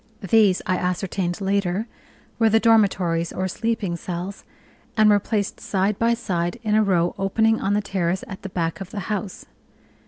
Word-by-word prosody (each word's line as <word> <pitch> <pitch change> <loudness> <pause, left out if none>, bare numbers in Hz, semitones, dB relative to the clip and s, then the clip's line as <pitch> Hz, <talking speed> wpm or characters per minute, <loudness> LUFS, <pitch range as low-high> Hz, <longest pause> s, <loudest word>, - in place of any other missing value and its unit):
These, 205 -3 +4
I 185 - +1
ascertained 180 0 -2
later, 195 +1 0 0.5
were 225 -1 +5
the 225 +1 +4
dormitories, 190 -7 +2
or 185 +1 -2
sleeping 210 -2 -2
cells, 180 +3 -6 0.5
and 215 -1 +6
were 205 - +5
placed 205 0 -2
side 195 +1 -1
by 235 +1 +3
side 175 -7 -2
in 215 -1 0
a 215 - +5
row 175 -4 +2
opening 220 +3 +2
on 200 +1 +1
the 210 - +1
terrace 185 -2 -1
at 195 -4 -8
the 195 - -6
back 165 -1 -2
of 190 - -6
the 205 -1 -5
house. 200 -2 -5
195 Hz, 175 wpm, -23 LUFS, 180-215 Hz, 0.5 s, and